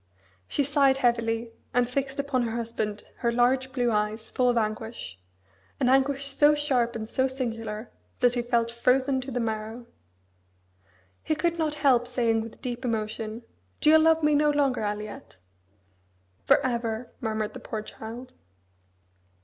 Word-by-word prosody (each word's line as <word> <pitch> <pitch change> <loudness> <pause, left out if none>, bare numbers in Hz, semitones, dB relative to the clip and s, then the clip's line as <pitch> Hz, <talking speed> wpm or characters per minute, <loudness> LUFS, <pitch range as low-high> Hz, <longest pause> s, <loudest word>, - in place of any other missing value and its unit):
She 285 - 0
sighed 275 -1 +4
heavily, 230 -2 0 0.2
and 245 -1 +3
fixed 270 +2 -2
upon 280 -2 0
her 230 -1 -2
husband 220 -3 -3
her 235 - 0
large 255 +2 +2
blue 245 -2 +1
eyes, 215 +1 -1
full 250 -1 +2
of 240 - +2
anguish 215 - -3 0.6
an - - +2
anguish 270 +1 +2
so 290 +2 +4
sharp 260 -5 0
and 220 -1 -4
so 260 +3 +1
singular 225 -4 -4 0.3
that 245 -1 +4
he 245 - 0
felt 235 -1 0
frozen 260 +3 +2
to 260 - -7
the 250 -1 -2
marrow. 220 +1 -3 1.4
He 310 - -1
could 340 +2 0
not 305 -2 0
help 245 -3 +5
saying 235 -3 +1
with 225 +3 -10
deep 245 -1 -4
emotion, 220 -1 -3 0.4
"Do 305 - +5
you 315 - +8
love 320 0 +4
me 300 0 +4
no 295 +1 +4
longer, 285 -4 +1
Aliette?" 210 - -5 1.1
"For - - +6
ever!" 235 -1 -2
murmured 215 -2 -2
the - - -8
poor 215 -1 -5
child. 235 +4 -9
245 Hz, 155 wpm, -27 LUFS, 225-270 Hz, 1.4 s, you